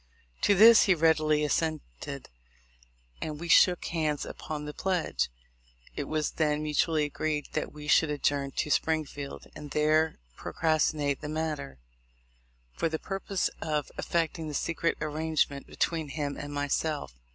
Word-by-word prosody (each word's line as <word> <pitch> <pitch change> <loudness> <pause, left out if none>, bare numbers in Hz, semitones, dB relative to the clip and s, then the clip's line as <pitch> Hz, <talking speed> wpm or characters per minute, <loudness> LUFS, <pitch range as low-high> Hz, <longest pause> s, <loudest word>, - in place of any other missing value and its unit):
To 205 - +4
this 225 +3 +8
he 190 - +4
readily 155 -2 +3
assented, 145 - -2 0.9
and 150 -1 -4
we 170 - -5
shook 180 +1 +5
hands 155 -3 -1
upon 150 -1 -6
the 150 - -6
pledge. 185 -1 -1 0.7
It 145 - -3
was 155 0 -1
then 150 -1 0
mutually 155 +1 +1
agreed 150 0 -2
that - - -2
we 150 0 -10
should 155 +1 +4
adjourn 145 -1 0
to 150 - -1
Springfield, 150 -3 -1
and 145 - -8
there 155 +2 +2 0.2
procrastinate 155 -3 0
the 150 - -5
matter, 155 - -3 1.0
for 165 - 0
the 160 - -2
purpose 195 +1 -2
of 150 -3 -2
effecting 165 -1 -1
the 150 - -5
secret 165 +2 0
arrangement 155 -2 -1
between 160 -2 -1
him 145 -1 -3
and 145 - -6
myself. 145 - -1
155 Hz, 140 wpm, -29 LUFS, 150-160 Hz, 1.0 s, this